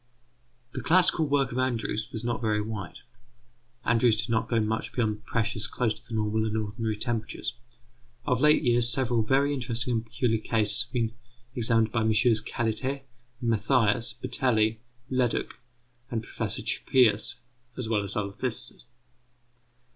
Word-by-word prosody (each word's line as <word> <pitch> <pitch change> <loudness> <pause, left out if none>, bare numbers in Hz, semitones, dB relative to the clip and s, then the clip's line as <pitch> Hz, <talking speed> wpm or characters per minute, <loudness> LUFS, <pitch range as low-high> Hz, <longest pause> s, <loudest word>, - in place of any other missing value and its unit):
The - - -4
classical 170 -2 +4
work 140 -2 +1
of 125 - -2
Andrews 115 -4 -1
was 110 - -5
not 120 0 -2
very 110 -2 +1
wide. 105 -4 -5 0.9
Andrews 115 -1 +3
did 115 - -2
not 115 0 0
go 115 - +2
much 110 +1 -2
beyond 110 -2 -1
pressures 110 -1 -1
close 115 -3 0
to 105 - -10
the 115 - -5
normal 110 0 0
and 110 0 -2
ordinary 110 0 -2
temperatures. 115 -1 -2 0.7
Of 125 -3 +1
late 150 +1 +5
years 120 -1 +4
several 120 -3 +2
very 135 +6 +2
interesting 120 -2 -1
and 115 -1 0
peculiar 115 -1 0
cases 110 +1 0
have 120 - -26
been 115 -3 -1 0.4
examined 115 -3 +2
by 115 - 0
MM. 110 0 +3
Cailletet, 130 +4 -2 0.4
Mathias, 115 0 +2
Batelli, 115 -2 +1 0.3
Leduc, 125 -2 0 0.5
P. 115 - -3 0.5
Chappuis, 115 -3 +2 0.4
and 125 -3 -3 0.3
other 100 -2 -2
physicists. 120 +2 -4
115 Hz, 140 wpm, -27 LUFS, 110-125 Hz, 0.9 s, late